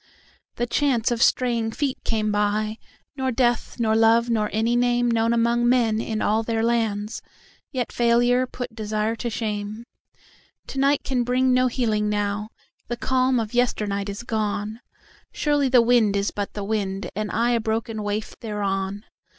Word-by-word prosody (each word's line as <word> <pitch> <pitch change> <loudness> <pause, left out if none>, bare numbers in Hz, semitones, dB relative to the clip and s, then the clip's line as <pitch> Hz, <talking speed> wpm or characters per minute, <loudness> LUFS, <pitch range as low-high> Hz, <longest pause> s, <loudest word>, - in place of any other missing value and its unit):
The 240 - -1
chance 245 -2 +1
of 235 -1 -1
straying 235 -3 +2
feet 275 0 -2
came 215 -2 0
by,—Nor 215 +6 -2
death 240 -1 0
nor 220 -2 +2
love 230 +1 +4
nor 215 -2 +1
any 225 +3 +1
nameKnown 240 -2 +2
among 235 +1 +2
men 230 -3 +2
in 220 -2 -2
all 215 +2 +2
their 225 0 -1
lands,—Yet 230 +3 -3
failure 240 +2 +3
put 245 -1 -6
desire 215 0 -1
to 235 - -3
shame. 215 0 -4 0.8
To 270 - -5
night 275 +1 +2
can 255 -2 0
bring 255 +1 +2
no 255 0 +4
healing 220 -4 0
now, 205 0 -1 0.4
The 240 - -3
calm 255 0 +1
of 220 0 -4
yesternight 210 -5 0
is 200 +3 -6
gone; 215 -1 -2 0.5
Surely 290 -3 +1
the 250 -2 +6
wind 230 -4 +3
is 200 0 0
but 205 -1 -4
the 205 - -4
wind, 200 -2 -2
And 215 +1 -2
I 235 +2 +1
a 235 - +2
broken 220 0 -2
waif 205 +1 -3
thereon. 200 -1 -3
225 Hz, 155 wpm, -24 LUFS, 210-245 Hz, 0.8 s, the